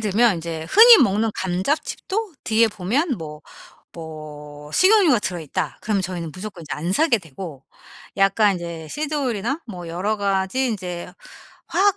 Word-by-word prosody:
들면 215 0 +3
인제 165 -1 -5
흔히 455 +1 +9
먹는 215 0 +2
감자칩도 305 - -2
뒤에 225 +1 +3
보면 230 - -1
뭐 150 -2 -8 0.5
뭐 150 -2 -10
식용유가 370 - +5
들어있다. 170 -7 -4
그러면 205 -3 0
저희는 175 -3 -4
무조건 185 +1 -8
이제 150 -4 -5
안 165 +6 -3
사게 295 +1 +3
되고 160 -5 -9 0.5
약간 195 +1 +4
이제 170 -2 -7
시드오일이나 280 - -2
뭐 175 -5 -8
여러 200 +6 -2
가지 200 +6 0
이제 180 -5 -5 0.6
화학 385 +4 +2
195 Hz, 305 characters per minute, -22 LUFS, 170-250 Hz, 0.6 s, 흔히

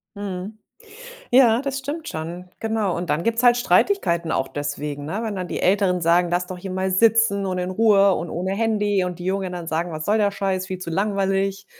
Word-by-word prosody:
Mhm, 200 +1 -6 0.7
ja, 240 -2 +5
das 275 -1 -3
stimmt 290 +4 -5
schon. 170 +3 -6
Genau. 220 -4 -1
Und 175 0 -4
dann 155 - 0
gibt's 230 +3 0
halt 240 -1 +6
Streitigkeiten 170 - +1
auch 135 - -1
deswegen, 145 0 -4
ne? 195 +9 -3
Wenn 220 -3 -3
dann 180 -1 -4
die - - -3
Älteren 185 -1 +2
sagen: 170 +1 +3
„Lass 175 +1 0
doch 185 0 -7
hier 190 +1 -7
mal 190 +1 -1
sitzen 220 0 +3
und 185 -1 -2
in 180 +1 -2
Ruhe 200 -1 +4
und 170 - -4
ohne 185 +3 -2
Handy“, 205 -2 +1
und 180 -1 -5
die 175 - -8
Jungen 190 0 -2
dann 175 -2 -6
sagen: 165 +1 -2
„Was 155 0 -5
soll 210 +2 +2
der 205 -1 +2
Scheiß? 190 -2 -2
Viel 185 -1 -5
zu 175 -2 -6
langweilig. 195 +1 -1
190 Hz, 215 wpm, -22 LUFS, 175-210 Hz, 0.7 s, halt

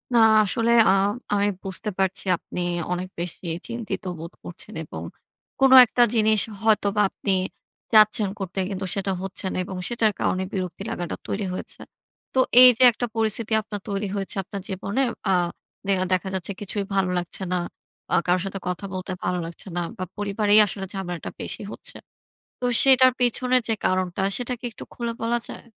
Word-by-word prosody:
না - - +6 0.2
আসলে 230 +3 +1 0.2
আ - - +6 0.4
আমি 205 0 +2 0.2
বুঝতে 195 +2 -3
পারছি 190 +1 0
আপনি 180 - -8 0.3
অনেক 180 +1 -2
বেশি 175 +1 -6 0.2
চিন্তিত 235 -3 -5 0.2
বোধ 165 +2 -8
করছেন 185 +4 -9
এবং 80 - -8 0.6
কোন 270 -1 +5
একটা 240 +1 +3
জিনিস 215 -1 +3 0.2
হয়তোবা 210 -2 +2
আপনি 195 - -2 0.6
চাচ্ছেন 215 -1 +5
করতে 190 0 -4
কিন্তু 190 -1 -4
সেটা 195 0 -1
হচ্ছে 195 0 -4
না - - -3
এবং 190 -1 -6
সেটার 225 -3 +1
কারণে 185 0 0
বিরক্তি 185 0 -4
লাগাটা 175 -7 -4
তৈরি 200 0 -2
হয়েছে। - - -6 0.5
তো, 260 - +2 0.2
এই 255 - +11
যে 255 - +4
একটা 245 +2 -3
পরিস্থিতি 220 0 +1
আপনার 205 -1 -7
তৈরি 200 0 -2
হয়েছে 195 0 -3
আপনার 200 +1 -7
জীবনে 200 +6 -2 0.3
আ - - +4 0.5
দেহা 185 -1 +2
দেখা 185 +1 0
যাচ্ছে 190 +2 -3
কিছুই 205 0 -3
ভালো 190 -2 +2
লাগছে 175 +2 -4
না - - +2 0.6
আ - - +5
কারো 180 +1 +3
সাথে 195 0 -5
কথা 180 +2 -3
বলতে 185 0 -5
ভালো 180 0 0
লাগছে 170 +4 -8
না - - +1 0.2
বা 185 - -3
পরিবারেই 205 +1 +3
আসলে 195 0 -4
ঝামেলাটা 175 -3 -5
বেশি - - -5
হচ্ছে। - - -8 0.6
তো 250 - -3 0.2
সেটার 260 -1 +7
পেছনে 250 +1 +2
যে 225 - +1
কারণটা 185 0 0 0.2
সেটা 250 0 -3
কী 250 - -7
একটু - - -10
খুলে 235 -1 -3
বলা 235 +1 +1
যায়? - - -9
200 Hz, 170 wpm, -24 LUFS, 185-220 Hz, 0.6 s, এই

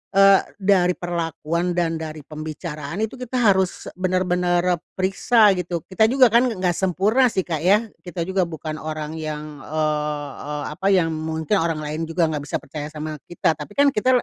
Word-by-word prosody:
eee, 195 0 +7
dari 185 -3 +3
perlakuan 170 0 -2
dan 165 -2 0
dari 155 -2 -7
pembicaraan 155 +3 -5
itu 220 +4 -4
kita 250 0 -6 0.2
harus 190 -1 -1
bener-bener 180 -1 +1 0.2
periksa 200 +4 +4
gitu, 175 -2 -3
kita 205 +3 +2
juga 255 -1 +5
kan 240 +3 +5
nggak 185 -6 0
sempurna 195 +8 +2
sih 190 -5 -1
Kak 160 -4 -3
ya, 200 +7 +4 0.2
kita 175 -2 -5
juga 190 0 0
bukan 155 -1 -6
orang 155 0 -5
yang, 150 -1 -6
eee 150 0 -2 0.2
eee, 150 -1 -3
apa, 190 +6 -3
yang 180 -5 +3
mungkin 160 +4 -1
orang 165 -2 -1
lain 155 +2 -3
juga 165 0 +1
nggak 150 -2 -3
bisa - - -3
percaya 150 +1 -6
sama 155 0 -6
kita, 175 -1 +1
tapi 175 +8 -8
kan 285 0 +5
kita 255 +2 +2
175 Hz, 175 wpm, -22 LUFS, 155-190 Hz, 0.2 s, eee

